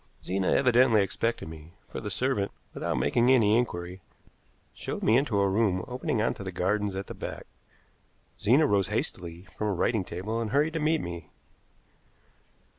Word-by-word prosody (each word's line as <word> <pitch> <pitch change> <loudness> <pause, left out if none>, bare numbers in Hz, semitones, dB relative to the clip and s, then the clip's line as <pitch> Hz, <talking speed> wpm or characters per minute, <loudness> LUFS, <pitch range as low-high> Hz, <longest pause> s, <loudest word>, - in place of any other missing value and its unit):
Zena 95 0 -1
evidently 125 -4 +5
expected 115 +1 -2
me, 80 +1 -11
for - - -6
the 105 - -4
servant, 125 -2 0 0.2
without - - -2
making 120 +1 +2
any 110 -5 +5
inquiry, 90 -6 -2 0.7
showed - - -5
me 110 - +4
into 125 -6 +2
a 100 - +3
room 95 -2 +1
opening 125 -3 -1
on - - +1
to - - -8
the 95 - -4
gardens 100 +2 0
at 95 +1 -4
the - - -8
back. - - -7 0.9
Zena 130 +9 +4
rose 100 - +2
hastily 85 +1 -4
from 105 - -2
a 105 - +1
writing 105 +3 +1
table 100 +7 -4
and 110 - -2
hurried 150 +6 +2
to 165 - -1
meet 155 0 +2
me. 85 -1 -7
105 Hz, 170 wpm, -28 LUFS, 95-125 Hz, 0.9 s, evidently